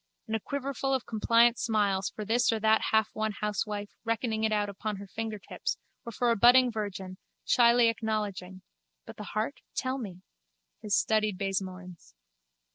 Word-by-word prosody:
and 220 Hz, -2 st, -2 dB
a -, -, 0 dB
quiverful 270 Hz, +2 st, -2 dB
of 260 Hz, -, -3 dB
compliant 230 Hz, +2 st, +3 dB
smiles 205 Hz, -4 st, +1 dB
for 215 Hz, -, -7 dB
this 230 Hz, +3 st, +2 dB
or 225 Hz, -, -1 dB
that 220 Hz, 0 st, +3 dB
halfwon 220 Hz, 0 st, +1 dB
housewife 210 Hz, 0 st, -2 dB
reckoning 225 Hz, -1 st, -1 dB
it 220 Hz, -, +2 dB
out 210 Hz, -1 st, +1 dB
upon 205 Hz, +1 st, -4 dB
her 200 Hz, +1 st, -8 dB
fingertips 220 Hz, +1 st, -4 dB, 0.3 s
or -, -, -4 dB
for 240 Hz, +1 st, +1 dB
a -, -, +3 dB
budding 245 Hz, +3 st, +6 dB
virgin, 195 Hz, -4 st, -5 dB, 0.3 s
shyly 235 Hz, -1 st, +5 dB
acknowledging 210 Hz, -5 st, -3 dB, 0.4 s
(but -, -, -10 dB
the 210 Hz, -, -6 dB
heart? 215 Hz, +6 st, -3 dB, 0.2 s
tell 260 Hz, +1 st, -1 dB
me!) 185 Hz, -6 st, -8 dB, 0.6 s
his 210 Hz, -2 st, 0 dB
studied 215 Hz, -3 st, +1 dB
baisemoins. 185 Hz, -, -5 dB
215 Hz, 155 wpm, -29 LUFS, 200-230 Hz, 0.6 s, budding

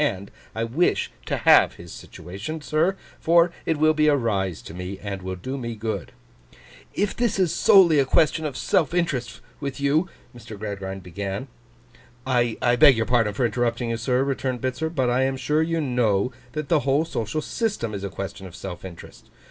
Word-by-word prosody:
And 100 Hz, -9 st, -2 dB, 0.2 s
I 115 Hz, -, -1 dB
wish 130 Hz, +10 st, +1 dB, 0.2 s
to -, -, -1 dB
have -, -, +5 dB
his 85 Hz, -1 st, -11 dB
situation, 100 Hz, -, -7 dB
sir, 160 Hz, +6 st, +1 dB, 0.2 s
for 170 Hz, +1 st, +4 dB, 0.2 s
it 160 Hz, -, +1 dB
will 155 Hz, +1 st, +4 dB
be 155 Hz, 0 st, +2 dB
a 150 Hz, -, +5 dB
rise 100 Hz, -, -1 dB
to -, -, -10 dB
me, 90 Hz, +2 st, -6 dB
and 100 Hz, -1 st, -6 dB
will 95 Hz, 0 st, -4 dB
do 130 Hz, +9 st, -5 dB
me 115 Hz, -2 st, -4 dB
good.' 110 Hz, -3 st, -4 dB, 0.8 s
'If 205 Hz, 0 st, 0 dB
this 240 Hz, -4 st, 0 dB
is 185 Hz, -4 st, +2 dB
solely 175 Hz, -6 st, +6 dB
a 135 Hz, -, +3 dB
question 155 Hz, +4 st, +2 dB
of 145 Hz, -4 st, -3 dB
self 165 Hz, -1 st, +1 dB
interest 150 Hz, -9 st, -1 dB, 0.2 s
with 140 Hz, -1 st, -5 dB
you—' 150 Hz, +6 st, +1 dB, 0.3 s
Mr. 115 Hz, -3 st, -10 dB
Gradgrind 95 Hz, -2 st, -5 dB
began. 100 Hz, +7 st, -5 dB, 0.8 s
'I 120 Hz, -1 st, +1 dB
beg 140 Hz, -5 st, +8 dB
your 115 Hz, -, +1 dB
pardon 115 Hz, -4 st, +1 dB
for 125 Hz, -, +1 dB
interrupting 120 Hz, +1 st, -1 dB
you, 115 Hz, -, -1 dB
sir,' 125 Hz, +3 st, +1 dB
returned 130 Hz, -2 st, -2 dB
Bitzer; 130 Hz, +6 st, -2 dB
'but 130 Hz, -6 st, 0 dB
I 125 Hz, +2 st, +2 dB
am 135 Hz, 0 st, 0 dB
sure 150 Hz, +4 st, +1 dB
you 165 Hz, +1 st, 0 dB
know 125 Hz, -6 st, +1 dB, 0.2 s
that 155 Hz, -2 st, -4 dB
the 160 Hz, 0 st, +3 dB
whole 140 Hz, +3 st, +1 dB
social 115 Hz, -2 st, -3 dB
system 195 Hz, -, -2 dB
is 100 Hz, -1 st, -5 dB
a 100 Hz, -, -3 dB
question 95 Hz, 0 st, -6 dB
of 90 Hz, -, -12 dB
self 90 Hz, -3 st, -7 dB
interest. 90 Hz, -3 st, -11 dB
125 Hz, 190 wpm, -24 LUFS, 100-155 Hz, 0.8 s, beg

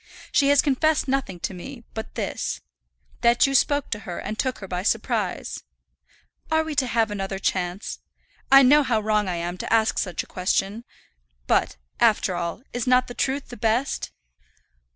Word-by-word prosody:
She 280 Hz, -, +3 dB
has 285 Hz, 0 st, +5 dB
confessed 295 Hz, +1 st, +2 dB
nothing 260 Hz, -9 st, -1 dB
to -, -, -3 dB
me 235 Hz, +7 st, -9 dB
but 220 Hz, -, -7 dB
this, -, -, -3 dB, 0.6 s
that 235 Hz, +2 st, +5 dB
you 275 Hz, -, 0 dB
spoke 285 Hz, +1 st, +2 dB
to 210 Hz, -, -1 dB
her 180 Hz, -5 st, -7 dB
and 215 Hz, -, -5 dB
took 260 Hz, -2 st, 0 dB
her 195 Hz, -, -8 dB
by 180 Hz, -1 st, -3 dB
surprise. 195 Hz, -, -1 dB, 0.9 s
Are 320 Hz, 0 st, +2 dB
we 315 Hz, -1 st, -4 dB
to 270 Hz, -3 st, +1 dB
have 225 Hz, -2 st, +1 dB
another 195 Hz, -1 st, -3 dB
chance? 185 Hz, 0 st, -2 dB, 0.5 s
I 275 Hz, 0 st, +9 dB
know 290 Hz, +4 st, +6 dB
how 245 Hz, -6 st, +1 dB
wrong 210 Hz, -1 st, +1 dB
I 180 Hz, -, -1 dB
am 175 Hz, +1 st, -4 dB
to -, -, -5 dB
ask 225 Hz, -1 st, +3 dB
such 180 Hz, -4 st, -2 dB
a -, -, -15 dB
question. 195 Hz, +5 st, -1 dB, 0.6 s
But, -, -, +1 dB, 0.2 s
after 215 Hz, -4 st, +3 dB
all, 175 Hz, +5 st, -4 dB
is 245 Hz, 0 st, -2 dB
not 250 Hz, 0 st, +4 dB
the 245 Hz, -, -8 dB
truth 270 Hz, +2 st, -2 dB
the 245 Hz, -, -9 dB
best?" 235 Hz, +4 st, 0 dB
230 Hz, 175 wpm, -24 LUFS, 195-270 Hz, 0.9 s, I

